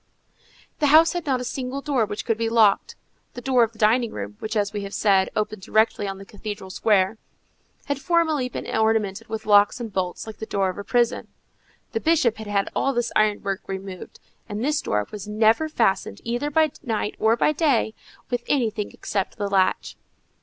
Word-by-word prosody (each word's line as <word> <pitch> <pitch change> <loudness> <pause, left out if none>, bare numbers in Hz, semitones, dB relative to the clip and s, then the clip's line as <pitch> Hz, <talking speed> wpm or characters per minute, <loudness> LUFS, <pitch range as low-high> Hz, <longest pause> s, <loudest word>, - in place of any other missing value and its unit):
The 295 - +3
house 320 +3 +6
had 350 -3 -4
not 260 -2 +1
a - - -3
single 255 +2 -4
door 275 -6 0
which 205 - -5
could 225 - +1
be 230 0 0
locked. 220 -3 +3 0.4
The 245 - -6
door 255 -1 +3
of 230 -1 +3
the 225 - -20
dining 230 +2 +3
room, 100 0 -6
which, 220 +1 -4
as 205 0 0
we 205 - -3
have 200 0 -6
said, 195 -3 +3
opened 215 -1 -2
directly 215 +1 +1
on 195 0 -4
the 195 - -11
cathedral 205 -2 -7
square, 200 +1 +2 0.7
had 285 -1 -3
formerly 320 -7 +1
been - - -6
ornamented 220 -3 0
with 220 0 -5
locks 205 +2 +5
and 225 -4 -6
bolts 180 -2 -2
like 220 -1 -9
the 220 - -7
door 195 -1 0
of 185 - -10
a - - -5
prison. 240 +2 +1 0.6
The 450 - -1
Bishop 315 - +2
had 220 -1 -8
had 200 -1 0
all 275 - +1
this 240 0 0
ironwork 205 -2 +1
removed, 190 -1 -7 0.3
and 210 +2 -3
this 300 +1 +1
door 105 0 -1
was 205 -1 -7
never 220 +8 +2
fastened, 200 - 0
either 240 +5 -2
by 310 0 +3
night 220 -6 -2
or 220 +1 +4
by 240 - +2
day, 280 -8 +1 0.4
with 245 -1 0
anything 225 -6 0
except 195 -2 -3
the 205 - -2
latch. 190 -1 +1
220 Hz, 195 wpm, -24 LUFS, 205-250 Hz, 0.7 s, house